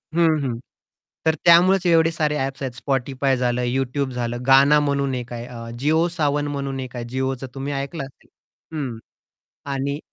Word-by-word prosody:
हं, 165 -2 +4
हं, 120 -3 -2 0.7
तर 160 - +4
त्यामुळेच 180 +2 +6
एवढे 165 -1 +4
सारे 150 -2 0
ॲप्स 135 +1 -3
आहेत 130 -2 -3
Spotify 135 0 0
झालं 125 0 0
YouTube 130 +2 -1
झालं 120 0 -2
गाना 140 +3 +6
म्हणून 140 -2 0
1 125 -1 -5
आहे 120 0 -5
अ, 115 -2 -8
जिओ 160 +5 +2
सावन 145 -3 0
म्हणून 140 -2 -3
1 125 -1 -7
आहे 120 - -4
जिओच 130 +1 -2
तुम्ही 135 +1 -4
ऐकलं 140 +2 -4
असेल. 135 - -16 0.5
हं, 125 -6 -3 0.7
आणि 140 +2 -2
135 Hz, 165 wpm, -22 LUFS, 130-150 Hz, 0.7 s, त्यामुळेच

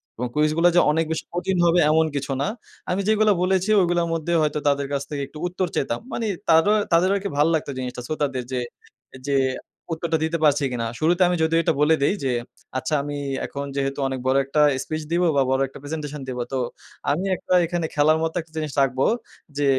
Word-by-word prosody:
এবং 125 +2 -3
কুইজগুলা 155 +3 +3
যে - - +7
অনেক 160 +2 +1
বেশি 160 - -3
কঠিন 180 +1 -1
হবে 170 +1 +4
এমন 160 +1 +4
কিছু 140 0 -3
না। - - 0 0.4
আমি 185 +2 0
যেগুলো 215 0 +4
বলেছি 190 +2 +1
ওগুলার 175 -1 +1
মধ্যে 165 +1 -1
হয়তো 150 -1 0
তাদের 140 -1 +1
কাছ 140 - 0
থেকে 145 -2 -3
একটু 145 - -13
উত্তর 180 +1 -2
চেতাম। 120 -3 -1
মানে 230 - -2 0.2
তারো 165 +5 +5 0.2
তাদের 170 +2 +4
কি 200 - -2
ভাল 145 +2 +4
লাগতো 150 -2 -1
জিনিসটা 125 -1 -5
শ্রোতাদের 140 -5 -2
যে, 130 - -1 0.7
যে 140 - +1 0.6
উত্তরটা 160 0 -1
দিতে 165 +1 -1
পারছি 145 -1 +4
কিনা। 115 -2 -2
শুরুতে 175 +4 +2
আমি 180 - +1
যদিও 165 +1 +3
এটা - - +2
বলে 160 +2 +5
দেই 145 - +3
যে 130 - +1 0.5
আচ্ছা 130 - -3
আমি 145 0 -4 0.3
এখন 140 0 -5
যেহেতু 140 0 -2
অনেক 130 -1 -3
বড় 130 +1 +3
একটা 145 +3 +1 0.2
স্পিচ 155 0 -4
দিব 170 +1 +2
বা 140 - +4
বড় 135 0 +2
একটা - - -13
প্রেজেন্টেশন 150 -1 -5
দিবো। 125 -1 -3
তো - - +1 0.5
আমি 170 +7 -1
একটা 185 - -3
এখানে 170 0 -2
খেলার 155 +1 +4
মতো 165 0 -2
একটা 160 -1 -19
জিনিস 155 -2 -2
রাখবো 130 0 +1 0.5
যে 145 - +1
155 Hz, 205 wpm, -23 LUFS, 140-170 Hz, 0.7 s, যে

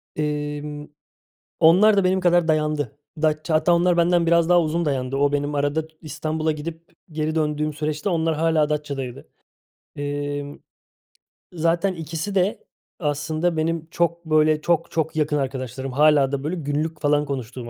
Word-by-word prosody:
Emm. 150 0 -3 0.7
Onlar 200 +6 +6
da 195 - +4
benim 185 +1 +2
kadar 175 -2 +3
dayandı. 150 -2 0 0.2
Datça, 155 +1 0
hatta 175 +3 +3
onlar 175 0 +3
benden 170 0 +3
biraz 170 0 +3
daha 175 -1 +6
uzun 165 +1 -1
dayandı. 135 -2 -1
O, 140 +1 +2
benim 145 0 -1
arada 145 +2 0 0.2
İstanbul'a 155 +1 -2
gidip 160 +2 -7 0.2
geri 155 0 -2
döndüğüm 150 -1 0
süreçte 150 +4 -2
onlar 165 -2 0
hâlâ 160 -1 +2
Datça'daydı. 140 -4 -4 0.7
Emm, 145 0 -4 1.0
zaten 170 +3 +1
ikisi 165 +4 -5
de 190 +2 +1 0.4
aslında 155 +2 -1
benim 160 0 -1
çok 170 0 -1
böyle 155 -1 +3
çok 165 0 0
çok 160 -1 -1
yakın 150 -1 +1
arkadaşlarım, 130 -1 -4
hâlâ 145 0 +4
da 140 -1 -2
böyle 155 +5 -2
günlük 155 0 -3
falan 145 0 +2
konuştuğum 125 -3 -5
155 Hz, 145 wpm, -23 LUFS, 145-165 Hz, 1.0 s, Onlar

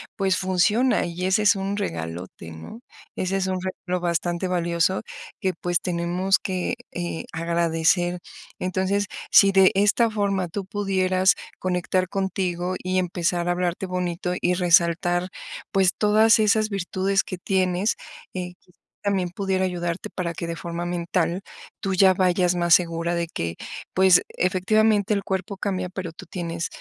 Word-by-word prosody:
pues, 190 -2 +1
funciona 205 +7 +2
y 175 +1 -4
ese 205 +3 +2
es 205 - +5
un 195 +1 -3
regalote, 85 - -5
¿no? 80 - -10 0.3
Ese 190 +1 -1
es 190 - -1
un 185 -1 -1
regalo 180 -1 -3
bastante 175 +1 -1
valioso 175 +1 +1 0.4
que, 190 -1 0
pues, 175 +1 -1
tenemos 180 +2 0
que, 185 +4 -2 0.2
eh, 175 -2 -4
agradecer. 170 +1 +1 0.4
Entonces, 190 +2 0 0.2
si 200 -1 +7
de 190 -1 +6
esta 205 +4 +3
forma 200 -4 0
tú 190 +3 -5
pudieras 190 -1 +2 0.2
conectar 185 0 0
contigo 185 -1 -2
y 185 0 -1
empezar 175 -1 -1
a - - +3
hablarte 180 +1 -1
bonito 180 -1 -2
y 180 - +1
resaltar, 175 0 +3 0.4
pues, 190 -2 +3
todas 220 +2 +5
esas 215 0 +3
virtudes 195 0 0
que 185 - -6
tienes, 185 +2 0 0.4
eh, 180 -1 -5
quizá 180 - -28 0.3
también 195 -3 0
pudiera 190 +1 -1
ayudarte 175 -1 -3
para 170 -2 -3
que 170 - -5
de 170 - -3
forma 170 +1 -5
mental 175 +1 -1 0.4
tú 195 -2 -1
ya 190 0 +6
vayas 180 -1 +2
más 175 -1 +3
segura 170 0 +2
de 170 0 -1
que, 85 - -4 0.4
pues, 185 -1 +6
efectivamente 205 +3 +2
el 200 -2 -1
cuerpo 190 +1 -3
cambia, 185 -2 -2
pero 180 -2 -5
tú - - -11
tienes, 170 -1 -4
185 Hz, 150 wpm, -24 LUFS, 175-195 Hz, 0.4 s, si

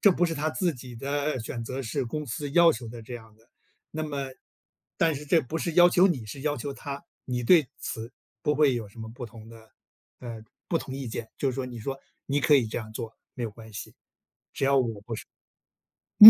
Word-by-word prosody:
这 200 - +8
不 175 - +3
是 165 - -1
他 155 +1 +1
自 175 +1 +1
己 125 -1 -9
的 140 +2 0
选 115 +1 -4
择， 130 +3 -3
是 130 +3 -1
公 150 +6 -3
司 145 +4 -2
要 170 +3 +8
求 125 -7 -3
的 115 +1 -7
这 120 +3 -7
样 110 -2 -10
的， 115 +2 -26 0.4
那 155 - -2
么 140 -3 -2 0.7
但 165 -2 +4
是， 150 - -6
这 165 +3 +5
不 150 +3 -4
是 170 0 -1
要 175 +1 +9
求 180 +1 +6
你 140 - 0
是 135 +6 -6
要 150 0 +1
求 140 -1 -3
他， 140 +2 -5 0.2
你 125 -1 -1
对 155 +4 +7
此 115 +2 -4 0.3
不 150 - +3
会 145 -3 +5
有 115 -3 -2
什 105 - -16
么 110 - -5
不 120 +1 -6
同 115 -1 -12
的 110 -1 -14 0.5
呃 115 -3 -6 0.2
不 165 - +3
同 130 - -6
意 135 -2 -3
见？ 110 0 -4
就 135 - +2
是 - - -4
说， 135 - 0
你 120 -2 -6
说 135 +4 -3 0.3
你 140 +1 +2
可 145 - +6
以 130 -5 +5
这 - - -4
样 110 -2 -7
做 110 0 -5 0.2
没 125 - -4
有 115 - -1
关 110 +1 -12
系， 100 - -6 2.3
只 210 - +15
要 - - +20
130 Hz, 240 characters per minute, -28 LUFS, 115-150 Hz, 2.3 s, 要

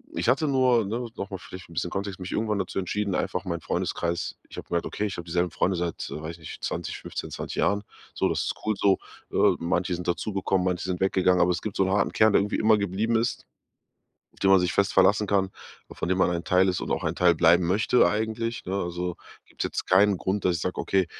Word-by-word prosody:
ich - - -1
hatte 135 +5 +3
nur, 130 -5 +3
ne, 120 +4 -3
noch 100 - -4
mal 95 - -5
vielleicht 90 0 -11
'n - - -13
bisschen 85 +1 -2
Kontext, 100 -1 -4
mich 90 0 -6
irgendwann 110 -1 0
dazu 95 0 -2
entschieden, 100 +1 -2
einfach 90 - -1
mein 85 -2 -2
Freundeskreis 85 +2 -2
ich - - -12
habe - - -7
gemerkt: 85 -1 -1
„Okay, 105 - -3
ich 100 - -4
habe 85 - -6
dieselben 85 0 0
Freunde 90 +3 0
seit, 85 -1 -3
weiß 80 +1 -5
ich 85 - -12
nicht, 80 - -10
20 - - -3
15, - - -6
20 - - -6
Jahren. 100 +1 +1 0.3
So, - - +1
das - - 0
ist - - -2
cool 110 - +2
so.“ 100 0 +3 0.3
Äh, - - +4
manche 90 +2 0
sind 90 0 -5
dazugekommen, 95 0 0
manche 90 -1 -1
sind 90 -1 -2
weggegangen, 95 -1 +3
aber 90 - +4
es 85 - -2
gibt 110 - -5
so - - +3
'n 95 - 0
harten 100 +1 +2
Kern, 110 -1 +4
der - - +6
irgendwie 105 - -1
immer 110 0 +4
geblieben 100 +4 0
ist, 115 +2 -2 0.9
auf - - -23
den 95 - +3
man 95 - +7
sich 90 -1 0
fest 100 -1 +2
verlassen 105 +2 +4
kann, 95 -1 +2 0.4
äh, - - -9
von - - -3
dem 95 0 +1
man 95 - +3
ein 85 -1 -2
Teil 95 +1 +3
ist 90 -1 0
und - - -5
auch - - -1
ein 80 - 0
Teil 90 -1 +4
bleiben 85 +1 +5
möchte 105 +7 +3
eigentlich, 110 +2 -2
ne, 95 - -3
also, 90 -2 -3 0.3
gibt's - - -7
jetzt - - -3
keinen 100 +2 +4
Grund, 95 +3 -2
dass 90 -2 +2
ich 85 - -5
sage: 90 - -2
„Okay, 95 -2 +1
95 Hz, 250 wpm, -26 LUFS, 90-105 Hz, 0.9 s, man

